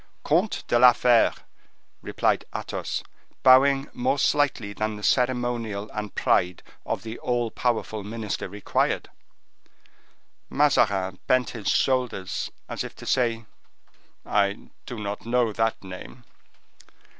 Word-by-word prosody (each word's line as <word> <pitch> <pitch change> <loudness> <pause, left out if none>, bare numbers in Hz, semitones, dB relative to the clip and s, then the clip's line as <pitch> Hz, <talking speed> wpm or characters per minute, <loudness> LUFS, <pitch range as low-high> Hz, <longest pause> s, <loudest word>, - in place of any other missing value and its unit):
"Comte 180 +8 +1
de 120 - +3
la 125 0 +8
Fere," 120 -1 +4 0.7
replied - - 0
Athos, - - -4 0.4
bowing 135 +2 +6
more 130 +3 0
slightly 135 -7 +1
than 110 +1 -2
the 105 - -10
ceremonial 120 -5 0
and 105 -1 -5
pride 90 0 +1 0.2
of - - -2
the 115 +1 -7
all 120 -2 -1
powerful 110 -3 -1
minister 105 -2 -4
required. 100 0 -1 1.4
Mazarin 100 -10 +2
bent 130 -1 +2
his 110 -5 -7
shoulders, 125 -8 0 0.2
as - - -4
if - - -8
to - - -11
say:— 115 -3 +1 0.8
"I 100 0 0 0.2
do 120 - -6
not 105 +1 -5
know 120 -2 +2
that 115 0 -1
name." 95 +6 -10
115 Hz, 120 wpm, -25 LUFS, 105-125 Hz, 1.4 s, la